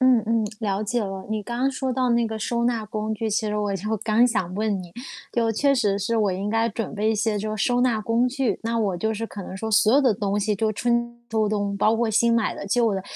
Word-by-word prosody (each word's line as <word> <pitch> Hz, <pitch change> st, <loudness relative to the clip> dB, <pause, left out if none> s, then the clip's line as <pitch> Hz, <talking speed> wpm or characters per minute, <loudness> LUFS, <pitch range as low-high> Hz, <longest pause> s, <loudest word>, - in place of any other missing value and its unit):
嗯 255 Hz, -1 st, +5 dB
嗯， 225 Hz, 0 st, +2 dB
了 205 Hz, -2 st, -1 dB
解 235 Hz, +3 st, -1 dB
了。 195 Hz, -1 st, -5 dB
你 215 Hz, -1 st, -1 dB
刚 235 Hz, +3 st, -5 dB
刚 270 Hz, +1 st, +2 dB
说 260 Hz, -1 st, -2 dB
到 255 Hz, 0 st, +1 dB
那 235 Hz, 0 st, +2 dB
个 220 Hz, 0 st, -4 dB
收 235 Hz, +2 st, -1 dB
纳 235 Hz, -2 st, 0 dB
工 215 Hz, +1 st, -3 dB
具， 220 Hz, +1 st, -3 dB
其 215 Hz, +1 st, 0 dB
实 210 Hz, 0 st, -1 dB
我 205 Hz, -1 st, -1 dB
就 215 Hz, +4 st, -2 dB
刚 220 Hz, +3 st, +3 dB
想 190 Hz, -7 st, -1 dB
问 205 Hz, -2 st, -1 dB
你。 175 Hz, -1 st, -13 dB, 0.4 s
就 230 Hz, -1 st, +1 dB
确 280 Hz, +5 st, +2 dB
实 205 Hz, -6 st, +1 dB
是 225 Hz, +4 st, -1 dB
我 210 Hz, -3 st, +2 dB
应 195 Hz, +3 st, -3 dB
该 225 Hz, +1 st, +2 dB
准 225 Hz, +2 st, -4 dB
备 215 Hz, +1 st, +1 dB
一 -, -, +1 dB
些 215 Hz, 0 st, 0 dB
就 215 Hz, +1 st, -3 dB
是 205 Hz, -, +1 dB
收 245 Hz, -1 st, +2 dB
纳 245 Hz, -3 st, +2 dB
工 230 Hz, +3 st, +1 dB
具， 255 Hz, -5 st, -1 dB
那 230 Hz, 0 st, -1 dB
我 200 Hz, -5 st, 0 dB
就 220 Hz, +5 st, -1 dB
是 225 Hz, +2 st, -3 dB
可 205 Hz, -, -8 dB
能 185 Hz, -, -7 dB
说 220 Hz, +3 st, -4 dB
所 215 Hz, 0 st, +4 dB
有 285 Hz, -, +6 dB
的 260 Hz, -5 st, +4 dB
东 200 Hz, 0 st, -1 dB
西 210 Hz, +1 st, 0 dB
就 215 Hz, +2 st, 0 dB
春 235 Hz, +1 st, 0 dB
秋 220 Hz, -1 st, +1 dB
冬， 205 Hz, -1 st, -1 dB
包 215 Hz, +2 st, +3 dB
括 230 Hz, -1 st, +1 dB
新 230 Hz, +2 st, +3 dB
买 230 Hz, -2 st, +1 dB
的、 -, -, -7 dB
旧 230 Hz, +1 st, +2 dB
的， 190 Hz, -, -3 dB
220 Hz, 290 characters per minute, -24 LUFS, 205-235 Hz, 0.4 s, 有